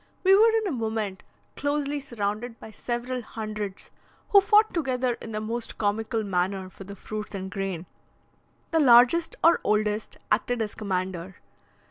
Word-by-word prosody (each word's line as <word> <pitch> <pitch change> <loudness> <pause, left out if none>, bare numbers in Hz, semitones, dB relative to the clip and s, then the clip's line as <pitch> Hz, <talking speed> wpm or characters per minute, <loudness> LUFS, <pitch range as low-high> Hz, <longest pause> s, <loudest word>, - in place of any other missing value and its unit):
We 385 +1 +7
were 440 +3 +6
in 445 -1 +1
a 385 - -1
moment 220 -6 -3 0.3
closely 290 0 -1
surrounded 230 -2 -4
by 220 - -10
several 245 +3 -3
hundreds, 215 -3 -6 0.4
who 400 - +7
fought 425 +2 +4
together 255 -6 0
in 225 - -7
the 215 - -2
most 230 +2 -4
comical 220 +2 -1
manner 190 0 -1
for 195 - -11
the 200 +1 -9
fruits 210 +1 -6
and 190 -1 -5
grain. 190 -3 -3 0.9
The 325 - +3
largest 260 +5 +6
or 335 +1 +5
oldest 210 0 0
acted 240 +3 +1
as 215 -2 -2
commander. 185 -2 -3
220 Hz, 150 wpm, -26 LUFS, 200-260 Hz, 0.9 s, We